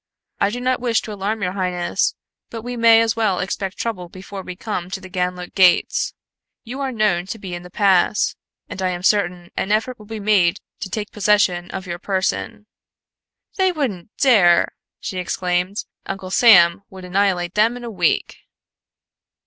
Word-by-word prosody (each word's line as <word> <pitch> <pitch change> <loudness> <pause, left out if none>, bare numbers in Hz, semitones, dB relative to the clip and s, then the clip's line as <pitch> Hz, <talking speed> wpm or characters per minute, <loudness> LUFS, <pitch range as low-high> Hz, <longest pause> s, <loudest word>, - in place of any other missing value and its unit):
I 200 - +3
do 240 +4 -4
not 255 +1 0
wish 235 -2 +1
to 215 - -6
alarm 205 +2 -3
your 180 - 0
highness, 180 -2 -1 0.3
but 225 -2 -7
we 245 +1 -5
may 230 -1 +6
as 225 0 0
well 215 -5 +1
expect 190 +1 -3
trouble 185 -7 -4
before 190 +2 -8
we 185 -1 -8
come 180 -3 -4
to 190 - -4
the 185 -1 -12
Ganlook 180 0 -3
gates 185 -2 +3 0.5
You 250 +4 -7
are 270 -1 -1
known 210 -6 +1
to 225 - -5
be 190 -4 -7
in 175 - -5
the 180 - -12
pass, 195 +1 +2 0.3
and 190 - -7
I 185 - +1
am 180 0 -4
certain 180 -3 +1
an 195 - -2
effort 225 +4 0
will 210 - -14
be 220 0 -6
made 200 -3 +3 0.2
to 195 - -5
take 210 +2 -4
possession 200 -4 +2
of 190 0 -6
your 175 -1 -5
person." 195 +2 -2 0.9
"They 380 -1 +3
wouldn't 240 - -3
dare!" 195 -11 +4 0.3
she 185 - -4
exclaimed. 180 +2 -1 0.2
"Uncle 190 -1 -5
Sam 180 -6 +6
would 190 -1 -10
annihilate 180 -2 0
them 225 +3 +2
In 245 - -10
a 235 - -5
week." 205 - 0
195 Hz, 180 wpm, -20 LUFS, 180-220 Hz, 0.9 s, may